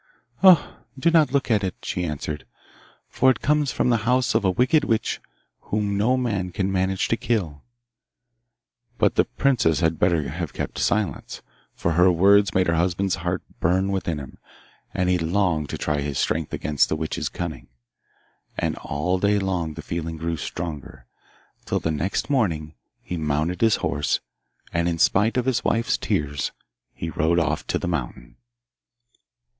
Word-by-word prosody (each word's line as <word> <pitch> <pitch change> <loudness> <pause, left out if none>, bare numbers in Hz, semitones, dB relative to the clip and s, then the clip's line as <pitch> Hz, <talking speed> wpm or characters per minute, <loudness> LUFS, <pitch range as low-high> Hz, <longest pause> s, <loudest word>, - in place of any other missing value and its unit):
'Ah! 185 -5 +5 0.2
do 170 +6 +2
not 160 -3 +4
look 140 -3 0
at 105 -2 +2
it,' 95 - -2
she 90 - -2
answered, 75 -3 -5 0.6
'for 130 - +3
it 130 - 0
comes 150 -2 +2
from 125 - +1
the 120 - +4
house 125 +4 +1
of 110 -1 +2
a 95 - +3
wicked 125 - +3
witch 115 -5 -1 0.4
whom 105 -1 -1
no 115 +6 +2
man 100 -8 -1
can 95 +1 -1
manage 95 0 0
to - - +1
kill.' 110 - -2 1.4
But - - +3
the - - +3
princess 115 - +1
had 80 -2 +1
better 85 -5 +2
have - - -5
kept - - -4
silence, 105 -2 -1 0.3
for 85 - -1
her 90 +3 +5
words 100 +2 +5
made 95 0 +4
her 85 - +1
husband's 90 +3 0
heart 90 +1 -2 0.2
burn 95 +4 +1
within 85 -5 -2
him, 70 -2 -9 0.5
and 90 - 0
he 90 0 +2
longed 85 -3 0
to - - -4
try 75 -1 -1
his 70 -1 -3
strength 80 -1 -1
against 75 -1 +1
the - - 0
witch's 80 0 -3
cunning. 85 -2 -6 0.9
And - - -1
all 90 +6 -1
day 105 +2 +2
long 90 -5 -2
the - - -7
feeling 85 -1 -4
grew 85 +1 -2
stronger, 75 -5 -6 0.6
till - - 0
the 80 - -1
next 80 +6 -1
morning 85 - 0 0.3
he 90 - -4
mounted 80 +3 -1
his 110 -1 +5
horse, 75 +1 0 0.5
and 85 0 +1
in 85 - -2
spite 105 +8 +3
of 125 - +1
his 130 -2 +1
wife's 115 0 +1
tears, 70 -1 -1 0.4
he 80 - -5
rode 80 +2 +1
off 85 - 0
to - - 0
the - - -4
mountain. - - -4
90 Hz, 170 wpm, -24 LUFS, 80-110 Hz, 1.4 s, Ah